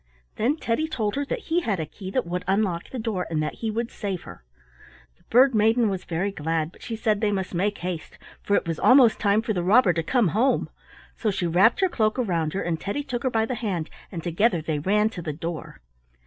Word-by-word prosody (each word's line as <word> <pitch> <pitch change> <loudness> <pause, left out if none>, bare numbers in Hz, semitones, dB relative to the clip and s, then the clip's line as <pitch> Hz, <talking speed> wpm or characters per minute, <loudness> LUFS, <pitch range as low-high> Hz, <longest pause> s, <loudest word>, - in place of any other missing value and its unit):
Then 250 +7 +1
Teddy 305 +3 -1
told 220 -9 -2
her 285 - -1
that 475 - -3
he 345 - +4
had 215 - -1
a 160 - -2
key 185 +5 -9
that 255 +6 -1
would 180 +1 -3
unlock 190 -3 0
the 260 - -6
door 220 -6 -2
and 160 -2 -1
that 150 - -2
he 225 - -1
would 230 +2 -2
save 195 -4 -4
her. - - -12 0.7
The - - -30
Bird 260 +3 +5
maiden 220 +1 +3
was 190 -2 -4
very 180 +4 -1
glad, 160 -2 -2
but - - -20
she 230 - -5
said 215 -2 0
they 210 -2 +2
must 190 -2 -2
make 200 +4 0
haste, 175 -3 -5 0.2
for 205 - +1
it - - 0
was 165 -2 -2
almost 255 -3 +6
time 210 +1 +2
for 220 - -1
the 180 - -1
robber 195 +1 +5
to 165 - 0
come 215 +4 +2
home; 240 - +1 0.4
so 220 - -1
she 185 -3 -1
wrapped 185 - +4
her 380 - +5
cloak 220 -9 0
around 170 -10 0
her, 195 - -2
and 165 -2 -2
Teddy 245 +9 -3
took 250 -4 -4
her 260 - +1
by 225 -2 +1
the 255 - -3
hand 200 -9 -3 0.2
and 170 -4 -6
together 175 +3 +2
they 155 -1 -2
ran 210 +7 +2
to 180 - -7
the 155 -2 -4
door. 165 - -6
205 Hz, 240 wpm, -25 LUFS, 175-230 Hz, 0.7 s, almost